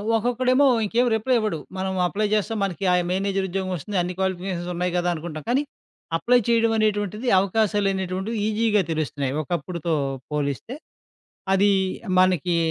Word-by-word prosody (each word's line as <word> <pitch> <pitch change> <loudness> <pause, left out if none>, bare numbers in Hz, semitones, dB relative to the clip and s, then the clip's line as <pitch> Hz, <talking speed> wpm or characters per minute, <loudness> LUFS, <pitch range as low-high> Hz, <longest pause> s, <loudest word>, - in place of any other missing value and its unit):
ఒక్కొక్కడేమో 250 +4 +2 0.2
ఇంకేం 240 +4 +2
రిప్లై 250 +4 +1
ఇవ్వడు. 215 -8 -2 0.2
మనం 190 0 -2
అప్లై 210 +4 -1
జేస్తే 215 +1 0
మనకి 195 0 -3
ఆ - - +4 0.2
మేనేజర్ 195 0 0
ఉద్యోగం 190 0 -3
వస్తుంది. 190 +5 -4
అన్ని 175 +1 -3
క్వాలిఫికేషన్స్ 185 -2 -2
ఉన్నాయి 180 +1 -1
గదా! 175 0 +1
అనుకుంటాం. 155 -1 -6
కానీ, 270 +4 +2 0.5
అప్లై 245 +8 +3
చేయడం 230 -1 +3
అనేటువంటిది 210 +1 0
అవకాశాలనేటువంటివి 195 0 0
ఈజీగా 215 -1 +2
తెలుస్తున్నాయి 145 -4 -2
ఒకప్పుడుతో 170 +1 -3 0.4
పోలిస్తే. 145 - -3 0.8
అదీ 200 +1 +4 0.5
మనకి 180 -2 +3
195 Hz, 130 wpm, -23 LUFS, 175-220 Hz, 0.8 s, ఆ